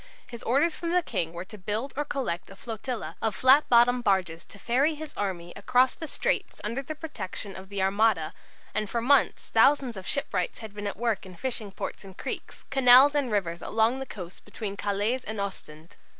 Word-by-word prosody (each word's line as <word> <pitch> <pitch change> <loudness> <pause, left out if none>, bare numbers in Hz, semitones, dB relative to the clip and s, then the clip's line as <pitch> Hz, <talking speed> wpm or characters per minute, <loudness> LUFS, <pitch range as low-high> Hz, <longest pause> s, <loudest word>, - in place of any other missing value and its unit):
His 235 -2 -10
orders 290 +7 +2
from 335 - -4
the 360 -1 +3
King 175 - -2
were 170 +2 -6
to 215 +2 -12
build 215 +8 -3
or 295 - 0
collect 255 -13 -3
a 195 - -11
flotilla 220 -6 -5
of 220 -3 0
flat 265 +7 +5
bottomed 245 +1 +5
barges 180 -5 +1
to - - -15
ferry 270 +9 +1
his 310 0 -8
army 175 -4 -3
across 250 +5 +3
the 320 - -7
straits - - -1
under 230 +6 -2
the 310 +3 -6
protection 210 - -6
of 190 0 -10
the 200 -1 -1
Armada, 195 -5 +2 0.4
and 215 -1 -2
for 235 - -1
months 265 +3 +2
thousands 255 +1 +4
of 190 -1 -8
shipwrights 285 - -1
had 220 -3 -9
been 205 0 -5
at 200 - -4
work 230 -2 0
in 185 -1 -11
fishing 215 0 -4
ports - - -6
and 190 -1 -12
creeks, - - -5
canals 265 +1 +7
and 280 -5 0
rivers 175 -5 -1
along 225 +4 +1
the 270 - -5
coast 180 -5 -9
between 210 -1 -6
Calais 205 +5 0
and 220 -1 -4
Ostend. 165 -5 -7
220 Hz, 200 wpm, -27 LUFS, 195-260 Hz, 0.4 s, canals